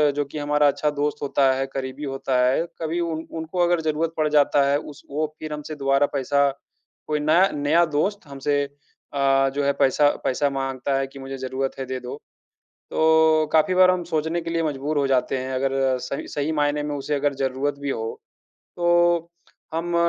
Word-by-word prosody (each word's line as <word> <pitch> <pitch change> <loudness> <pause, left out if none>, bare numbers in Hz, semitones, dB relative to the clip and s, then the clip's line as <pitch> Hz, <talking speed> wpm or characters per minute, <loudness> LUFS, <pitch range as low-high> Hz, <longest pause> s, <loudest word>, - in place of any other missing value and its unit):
जो 145 0 0
कि 140 - -9
हमारा 150 0 +2
अच्छा 150 +1 +1
दोस्त 145 0 -2
होता 135 -1 +2
है, 135 0 -1
करीबी 135 +2 -5
होता 135 -2 -1
है, 135 +6 +2 0.2
कभी 165 +2 -1
उन 165 -2 -2
उनको 160 +3 -5
अगर 175 -1 +2
ज़रूरत 160 +1 -1
पड़ 155 -1 +2
जाता 145 -1 +4
है, 140 - +3
उस 150 -2 -11
वो 155 +2 0
फिर 155 -1 -5
हमसे 150 +1 -6
दोबारा 135 0 +2
पैसा 140 +1 +2 0.6
कोई 150 -1 0
ना 160 +6 +4
नया 150 +4 +3
दोस्त 200 +2 -1
हमसे 145 +1 -1
अ, 140 -1 -1
जो 145 - 0
है 140 - +3
पैसा 145 +1 +4 0.2
पैसा 140 +2 +1
माँगता 135 0 -2
है 135 - -1
कि 135 +1 -12
मुझे 135 0 -6
ज़रूरत 130 +1 -3
है, 135 - -3
दे 130 0 -4
दो। 125 +2 -7 0.7
तो, 160 0 +4
काफ़ी 160 +3 +3
बार 185 0 +6
हम 185 -1 0
सोचने 160 0 -1
के 165 - -5
लिए 165 0 0
मजबूर 145 0 -1
हो 140 - +2
जाते 130 0 +1
हैं 130 +1 -4
अगर 135 +1 0 0.3
सइ 130 +2 -5
सही 145 +2 -2
मायने 145 -1 +1
में 150 0 -3
उसे 145 +1 -2
अगर 145 0 0
ज़रूरत 135 +1 -2
भी 140 0 -2
हो, 115 -3 -4 0.6
तो 175 -1 +2 0.4
हम 170 +1 -2
145 Hz, 195 wpm, -23 LUFS, 135-160 Hz, 0.7 s, बार